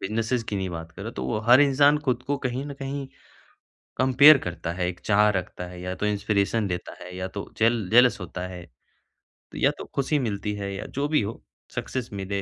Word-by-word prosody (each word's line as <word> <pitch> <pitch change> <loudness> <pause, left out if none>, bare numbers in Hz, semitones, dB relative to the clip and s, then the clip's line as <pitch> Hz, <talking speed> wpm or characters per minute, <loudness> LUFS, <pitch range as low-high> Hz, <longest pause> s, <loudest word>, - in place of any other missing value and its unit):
बिज़नेसिज़ 115 +4 -1
की 105 - -2
नहीं 95 -1 -2
बात 80 -1 -7
कर - - -9
रहा - - -5
तो 65 - -3
वो 65 - -1
हर 125 +4 +8
इंसान 145 +1 +5
खुद 125 -1 0
को 145 +1 0
कहीं 130 +1 -3
न 145 - -6
कहीं 135 0 -5 0.9
कंपेयर 130 +4 +7
करता 85 -1 -4
है 90 0 -2
एक 90 -1 -6
चाह 105 0 +3
रखता 90 -2 -4
है 90 0 -10
या 90 +1 -4
तो 105 - -2
इंस्पिरेशन 105 +1 0
देता 90 -1 -5
है 90 0 -9
या 95 0 -3
तो 100 - -5
जेल 115 -3 +2
जेलस 125 0 +5
होता 90 0 -5
है 90 -2 -9 0.9
या - - +3
तो - - -7
ख़ुशी 140 +2 +1
मिलती 105 -4 -2
है 100 -1 -4
या - - -6
जो 145 - +1
भी 150 -3 +2
हो, 105 +2 -5 0.3
सक्सेस 125 -2 -3
मिले 100 0 -3
105 Hz, 215 wpm, -25 LUFS, 95-130 Hz, 0.9 s, हर